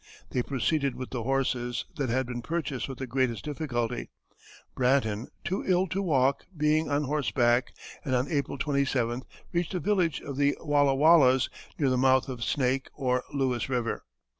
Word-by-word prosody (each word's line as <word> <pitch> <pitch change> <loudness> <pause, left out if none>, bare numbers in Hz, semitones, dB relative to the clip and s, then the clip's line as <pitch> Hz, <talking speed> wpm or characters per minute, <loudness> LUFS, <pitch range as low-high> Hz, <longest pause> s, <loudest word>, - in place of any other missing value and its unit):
They 125 - +1
proceeded 140 +2 0
with 130 - -6
the 125 - -3
horses, 125 -1 -1
that 135 -3 -1
had 130 +3 +1
been 120 0 -5
purchased 145 -5 -3
with 135 - -6
the 130 - -4
greatest 125 -3 -1
difficulty, 125 -6 -2 0.6
Bratton, 125 -4 +1 0.2
too 190 +3 -2
ill 185 0 +2
to 190 +3 -1
walk, 140 -6 +2
being 150 +1 +2
on 145 +1 +1
horseback, 130 -4 +1 0.3
and 130 -5 0
on 125 +2 +1
April 140 -3 -1
27th 130 -4 0 0.3
reached 175 +1 -1
a - - 0
village 180 -6 +1
of 140 -2 -7
the 145 0 +2
Wallawallas, 145 -2 +4 0.3
near 140 -4 +2
the 130 - +2
mouth 130 +1 +3
of 125 -3 -4
Snake 130 +3 0
or 125 -2 0
Lewis 130 -3 -1
River. 120 -3 -1
135 Hz, 165 wpm, -28 LUFS, 125-145 Hz, 0.6 s, Wallawallas